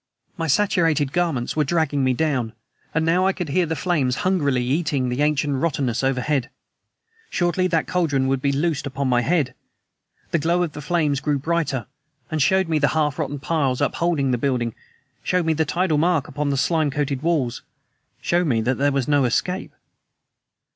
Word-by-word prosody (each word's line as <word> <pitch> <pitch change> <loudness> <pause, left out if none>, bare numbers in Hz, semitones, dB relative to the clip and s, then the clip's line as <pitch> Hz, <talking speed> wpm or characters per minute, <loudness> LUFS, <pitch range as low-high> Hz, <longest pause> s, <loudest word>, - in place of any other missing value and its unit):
My 165 -1 -3
saturated 165 -5 +2
garments 165 -9 0
were 155 - +2
dragging 150 -2 0
me 130 -1 +2
down, 130 -7 -1 0.4
and 160 0 0
now 180 +3 +3
I 195 - +2
could 180 -5 -5
hear 170 +4 +1
the 160 - -2
flames 150 -8 0
hungrily 145 -9 +1
eating 145 0 0
into 125 -1 -1
the 140 - -2
ancient 150 -1 +1
rottenness 135 -6 0
overhead. 135 0 0 0.8
Shortly 175 +1 +1
that 165 -3 +1
cauldron 150 -7 0
would 135 -1 0
be 140 - +1
loosed 150 0 -1
upon 140 0 -2
my 120 -1 +3
head. 140 -1 +1 0.8
The 170 - +2
glow 170 +3 +1
of 170 - -3
the 150 - -8
flames 150 -3 0
grew 150 -1 0
brighter... 145 -5 -1 0.5
and 155 -1 0
showed 190 +5 +3
me 160 -2 +1
the 140 - +3
half 150 -1 0
rotten 145 -2 -2
piles 140 -3 0
upholding 165 -6 0
the 125 - 0
building, 120 -4 0 0.5
showed 180 -2 0
me 160 - +2
the 160 +1 0
tidal 160 0 +1
mark 160 -3 +2
upon 145 +1 -2
the 140 - 0
slime 155 +1 +1
coated 140 -1 -2
walls 150 -7 0 0.6
showed 175 0 +1
me 120 -5 +2
that 125 +4 -1
there 145 +1 +3
was 135 -2 -1
no 145 -2 +3
escape! 180 +10 -1
150 Hz, 185 wpm, -22 LUFS, 135-170 Hz, 0.8 s, now